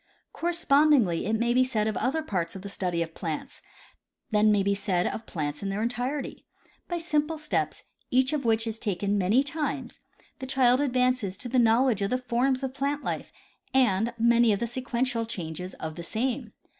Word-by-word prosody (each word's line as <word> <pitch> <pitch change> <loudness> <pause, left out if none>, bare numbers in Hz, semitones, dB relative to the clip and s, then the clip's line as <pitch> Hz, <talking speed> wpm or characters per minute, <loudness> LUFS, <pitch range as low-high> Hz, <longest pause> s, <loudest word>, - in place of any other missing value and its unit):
Correspondingly 295 - +3
it 220 - +1
may 235 +1 +1
be 255 +1 +5
said 230 -5 0
of 215 - -1
other 300 +9 0
parts 180 - -2
of 190 - -8
the 200 - -6
study 180 -3 -1
of 165 -1 -10
plants; 160 -3 -5 0.7
then 210 0 +4
may 205 -1 +3
it - - 0
be 200 +1 +2
said 185 -3 0
of 225 - -4
plants 150 -3 -3
in 200 - -2
their 200 +3 -2
entirety. 245 +4 -3 0.4
By 345 - -2
simple 320 -1 0
steps, 305 0 -2 0.3
each 260 +3 +2
of 295 -2 -1
which 225 -1 +2
is 225 -1 -4
taken 200 -1 -1
many 205 +8 +3
times, 305 +1 -4 0.4
the 260 - -6
child 255 0 +3
advances 250 -7 +1
to 245 - -6
the 255 +1 +2
knowledge 230 -1 +3
of 200 - 0
the 255 - +1
forms 255 +2 0
of 265 -1 -2
plant 280 +1 -2
life - - -4 0.4
and 230 -3 +3
many 235 0 +4
of 200 - +1
the 235 - 0
sequen 245 +1 -2
tial 230 -3 -1
changes 180 -2 -5
of 160 0 -5
the - - -5
same. 230 +8 -2
235 Hz, 195 wpm, -27 LUFS, 200-265 Hz, 0.7 s, be